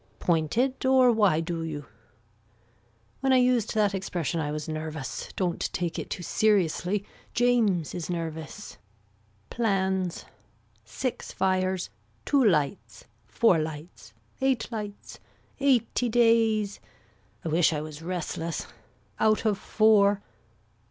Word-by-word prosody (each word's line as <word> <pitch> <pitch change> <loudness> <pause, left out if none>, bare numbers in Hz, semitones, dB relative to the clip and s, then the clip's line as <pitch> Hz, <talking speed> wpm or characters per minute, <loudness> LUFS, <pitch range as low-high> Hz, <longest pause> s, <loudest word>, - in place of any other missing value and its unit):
Pointed 180 - 0
or 260 -1 +5
why 205 -8 +3
do 165 0 -3
you. 150 -3 -5 1.3
When 270 0 +1
I 260 - +6
used 250 -3 +2
that 210 -2 +2
expression 175 -4 -2
I 150 -2 -2
was 150 0 -4
nervous. 155 -5 -5
Don't 180 -3 -1
take 175 -2 -2
it - - -6
too 175 - -5
seriously 200 -1 +1 0.3
James 230 -9 +2
is 175 -1 -5
nervous. 165 +2 -6 0.7
Plans. 190 -5 0 0.6
Six 235 - -4
fires. 185 -1 0 0.3
Two 280 -2 +3
lights. 165 - 0 0.2
Four 205 -8 +3
lights. 155 -6 -7 0.3
Eight 265 -3 0
lights. 210 -2 -7 0.4
Eighty 250 -3 +2
days. 225 -3 +3 0.7
I - - -1
wish 165 +2 +3
I 150 -2 -2
was 155 0 -8
restless. 170 -1 -3 0.5
Out 215 +1 +2
of 215 -2 +3
four. 205 -2 +3
190 Hz, 115 wpm, -27 LUFS, 165-225 Hz, 1.3 s, I